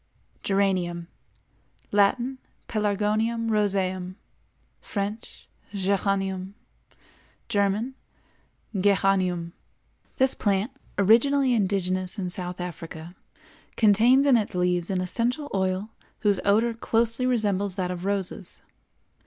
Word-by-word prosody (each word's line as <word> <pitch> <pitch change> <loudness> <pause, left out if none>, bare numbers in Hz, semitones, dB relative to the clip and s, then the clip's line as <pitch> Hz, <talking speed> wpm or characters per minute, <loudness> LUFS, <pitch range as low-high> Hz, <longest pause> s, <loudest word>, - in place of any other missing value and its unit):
GERANIUM. 185 -4 0 0.8
Latin—Pelargonium 220 0 0
roseum; 190 -3 0 0.7
French—Géranium; 195 -2 -3 0.9
German—Geranium. 195 -4 -1 0.7
This 265 0 +4
plant, 200 +3 0 0.3
originally 250 +6 +4
indigenous 185 -3 0
in 180 -3 -3
South 180 -1 -4
Africa, 170 -1 -7 0.6
contains 230 +6 +5
in 270 -4 +6
its 210 -4 -2
leaves 180 -1 +1
an 185 -2 0
essential 245 - -1
oil 190 +2 -1 0.3
whose 205 -3 +2
odor 220 +4 +3
closely 230 +2 +1
resembles 205 -5 +1
that 180 -2 -2
of 180 -1 -5
roses. 195 -1 -3
200 Hz, 80 wpm, -26 LUFS, 185-225 Hz, 0.9 s, in